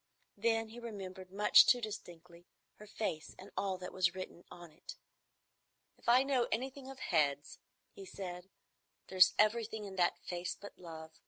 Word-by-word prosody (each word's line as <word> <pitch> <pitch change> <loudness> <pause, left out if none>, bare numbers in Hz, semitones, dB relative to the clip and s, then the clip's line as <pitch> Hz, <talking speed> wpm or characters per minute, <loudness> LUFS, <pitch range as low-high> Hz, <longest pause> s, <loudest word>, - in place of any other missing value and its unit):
Then 225 +1 +1
he 235 +2 -10
remembered 190 -5 -8
much 205 +2 +7
too 250 - +5
distinctly 175 -6 -8 0.3
her 210 - -12
face 180 -7 -4
and 190 - -12
all 195 -2 -1
that 180 0 -8
was 180 -1 +2
written 185 -2 -8
on 175 -2 -12
it. 165 - -10 1.0
"If - - -5
I 250 +2 +7
know 265 -3 +1
anything 265 +3 -3
of 270 - -9
heads," 145 - 0 0.3
he 195 - -11
said, 180 -1 -7 0.6
"there's 185 -1 +6
everything 220 0 +1
in 195 -1 -8
that 175 -1 +3
face 175 0 -4
but 205 - -11
love. 160 -2 -9
190 Hz, 160 wpm, -34 LUFS, 175-225 Hz, 1.0 s, much